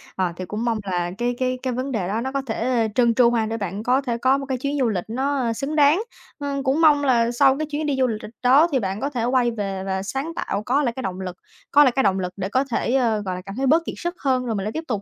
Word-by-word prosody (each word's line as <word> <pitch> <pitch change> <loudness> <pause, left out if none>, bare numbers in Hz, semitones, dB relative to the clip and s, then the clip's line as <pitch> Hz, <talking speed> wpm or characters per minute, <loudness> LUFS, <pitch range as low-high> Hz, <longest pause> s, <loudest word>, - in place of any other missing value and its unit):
À, 185 -2 -1
thì 185 - -5
cũng 210 +5 -4
mong 230 -2 +1
là 175 -1 -1
cái 245 +1 -1
cái 255 0 -1
cái 255 -1 -1
vấn 255 +3 -3
đề 205 -8 -1
đó 215 +4 -1
nó 265 +2 -3
có 275 0 -1
thể 230 0 0
trơn 235 -2 +4
tru 240 -1 +5
ha, 230 -2 +1
để 225 +1 -3
bạn 200 0 -4
có 255 +3 +2
thể 240 -4 -2
có 260 +3 +3
một 275 - -5
cái 265 -1 -2
chuyến 280 +3 -2
du 250 -3 +2
lịch 185 -5 -2
nó 260 0 -1
xứng 275 +6 -3
đáng. 300 +5 +5 0.4
Ừm, 280 -1 -3
cũng 270 +4 +1
mong 295 -3 +5
là 235 -4 +3
sau 265 +3 +4
cái 310 - -2
chuyến 300 +1 -2
đi 290 -2 0
du 260 - +3
lịch 220 -3 -3 0.2
đó 270 +6 +6
thì 270 - +2
bạn 195 -2 -3
có 275 - -1
thể 250 -5 -3
quay 245 0 +2
về 195 -4 -4
và 190 0 -2
sáng 270 +10 -3
tạo, 200 -8 -3
có 280 +4 +2
lại 240 -4 0
cái 260 - -5
động 190 0 -4
lực 180 -1 -6 0.3
có 290 - +7
lại 260 - +4
cái 265 - +2
động 195 -1 +2
lực 180 -1 -3
để 190 0 -3
có 260 +6 +2
thể, 235 - 0
ơ, 230 -5 +2
gọi 185 -1 -2
là, 180 - -6
cảm 195 0 -7
thấy 265 +2 0
bớt 325 +5 +3
kiệt - - -5
sức 345 +1 -4
hơn, 260 -2 0
rồi 230 -2 -2
mình 195 - -2
lại 210 - -3
tiếp 320 +7 -4
tục 215 -5 -2
245 Hz, 310 wpm, -22 LUFS, 210-275 Hz, 0.4 s, có